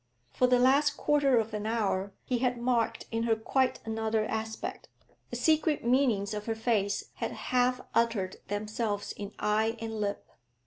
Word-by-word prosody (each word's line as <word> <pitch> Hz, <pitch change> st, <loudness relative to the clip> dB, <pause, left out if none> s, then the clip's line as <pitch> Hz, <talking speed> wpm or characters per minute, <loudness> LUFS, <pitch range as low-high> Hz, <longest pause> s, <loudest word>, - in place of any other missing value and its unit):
For 250 Hz, -, +3 dB
the 250 Hz, 0 st, +4 dB
last 280 Hz, +4 st, +4 dB
quarter 285 Hz, -4 st, +3 dB
of 220 Hz, 0 st, -3 dB
an 210 Hz, 0 st, -3 dB
hour 200 Hz, -3 st, 0 dB
he 250 Hz, -2 st, 0 dB
had 250 Hz, 0 st, +1 dB
marked 235 Hz, -1 st, 0 dB
in 225 Hz, 0 st, -1 dB
her 230 Hz, -1 st, +2 dB
quite 255 Hz, +4 st, 0 dB
another 220 Hz, -1 st, 0 dB
aspect; 220 Hz, 0 st, -4 dB, 0.4 s
the -, -, -5 dB
secret 315 Hz, -3 st, +2 dB
meanings 235 Hz, -5 st, +2 dB
of 210 Hz, +1 st, -5 dB
her 225 Hz, -, 0 dB
face 220 Hz, -3 st, 0 dB
had -, -, -3 dB, 0.2 s
half 250 Hz, 0 st, +3 dB
uttered 230 Hz, -5 st, +1 dB
themselves 210 Hz, 0 st, -2 dB
in 200 Hz, -1 st, -7 dB
eye 220 Hz, +2 st, +1 dB
and 225 Hz, -1 st, -4 dB
lip. 205 Hz, -1 st, -2 dB
225 Hz, 165 wpm, -30 LUFS, 210-250 Hz, 0.4 s, the